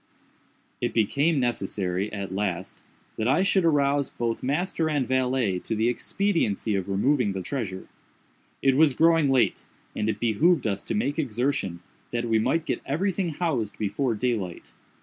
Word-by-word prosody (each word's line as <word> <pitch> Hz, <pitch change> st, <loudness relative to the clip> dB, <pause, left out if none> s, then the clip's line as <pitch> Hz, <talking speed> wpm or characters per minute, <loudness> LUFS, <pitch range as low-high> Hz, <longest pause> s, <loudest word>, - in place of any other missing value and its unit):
It -, -, -1 dB
became 140 Hz, +8 st, +2 dB
necessary, 100 Hz, -5 st, -1 dB
at 100 Hz, -2 st, -5 dB
last, 95 Hz, -2 st, -3 dB, 0.4 s
that 110 Hz, -, 0 dB
I 145 Hz, +9 st, +3 dB
should 195 Hz, -1 st, +2 dB
arouse 145 Hz, -3 st, +2 dB
both 115 Hz, -1 st, -3 dB
master 160 Hz, +4 st, 0 dB
and 145 Hz, -5 st, 0 dB
valet 130 Hz, -7 st, +1 dB
to 110 Hz, -, -3 dB
the 110 Hz, +2 st, +2 dB
expediency 120 Hz, -, 0 dB
of 95 Hz, 0 st, -2 dB
removing 110 Hz, +2 st, +2 dB
the 95 Hz, -1 st, -4 dB
treasure. 100 Hz, -9 st, -4 dB, 0.8 s
It 135 Hz, -1 st, +4 dB
was 145 Hz, -2 st, +4 dB
growing 165 Hz, -2 st, +4 dB
late, 130 Hz, -3 st, +2 dB, 0.3 s
and 105 Hz, -, -1 dB
it -, -, -2 dB
behooved 120 Hz, -, +2 dB
us 100 Hz, -2 st, -1 dB
to -, -, -2 dB
make 135 Hz, +9 st, -1 dB
exertion, 120 Hz, -, -1 dB, 0.3 s
that 120 Hz, 0 st, -2 dB
we 115 Hz, -1 st, +2 dB
might 150 Hz, +8 st, +1 dB
get -, -, -2 dB
every 180 Hz, +9 st, 0 dB
thing 185 Hz, -1 st, -2 dB
housed 145 Hz, -, -2 dB
before 110 Hz, +4 st, -1 dB
daylight. 105 Hz, -7 st, -3 dB
125 Hz, 160 wpm, -26 LUFS, 105-145 Hz, 0.8 s, It